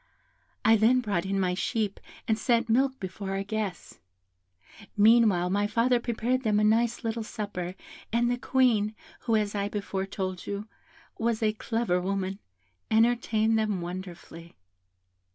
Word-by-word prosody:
I 225 0 +6
then 230 +4 +4
brought 200 -7 -1
in 195 0 0
my 180 -1 +1
sheep, 200 +2 -2 0.3
and 220 - +3
set 235 +1 +1
milk 265 +3 +2
before 190 +1 -5
our 195 - -2
guests. 205 -3 -5 1.0
Meanwhile, 210 -5 +5
my 205 +1 +1
father 235 +3 +2
prepared 240 +2 -1
them 215 -4 +2
a - - +2
nice 230 +3 +2
little 225 0 -2
supper, 200 -5 -5 0.4
and 235 +1 +2
the 245 0 0
Queen, 230 -6 +2 0.2
who, 230 - 0
as 210 -1 0
I 200 -1 -1
before 195 -2 -3
told 185 -2 -4
you, 205 +1 -4 0.5
was 230 0 0
a 215 -1 +2
clever 225 -4 -1
woman, 195 +1 -2 0.5
entertained 225 -1 +2
them 210 -3 0
wonderfully. 175 -1 -8
215 Hz, 145 wpm, -28 LUFS, 195-230 Hz, 1.0 s, I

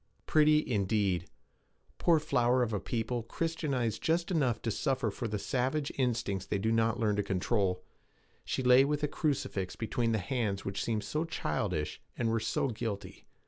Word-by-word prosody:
Pretty, 155 0 +4
indeed! 100 -5 +1 0.7
Poor 170 -2 +5
flower 125 -4 +2
of 115 -2 -2
a 105 - 0
people 120 +2 -2
Christianized 135 -4 -2
just 170 +2 +1
enough 135 -9 +1
to 115 - 0
suffer 135 +4 0
for 120 - -4
the 105 -1 -2
savage 135 +7 -1
instincts 115 -7 -1
they - - 0
do 110 +3 0
not 115 +1 +2
learn 105 -3 +2
to - - +3
control! 95 -1 0 0.6
She 130 - -2
lay 125 +1 +7
with 150 +1 -1
a - - +3
crucifix 135 - -2
between 115 +1 -1
the 110 - +2
hands 105 -2 -2
which 100 0 -2
seemed 110 -2 -1
so 155 +1 -1
childish, 90 - -2 0.2
and 115 -2 +1
were 115 - +1
so 135 - 0
guilty. 105 -5 -5
115 Hz, 170 wpm, -31 LUFS, 105-135 Hz, 0.7 s, lay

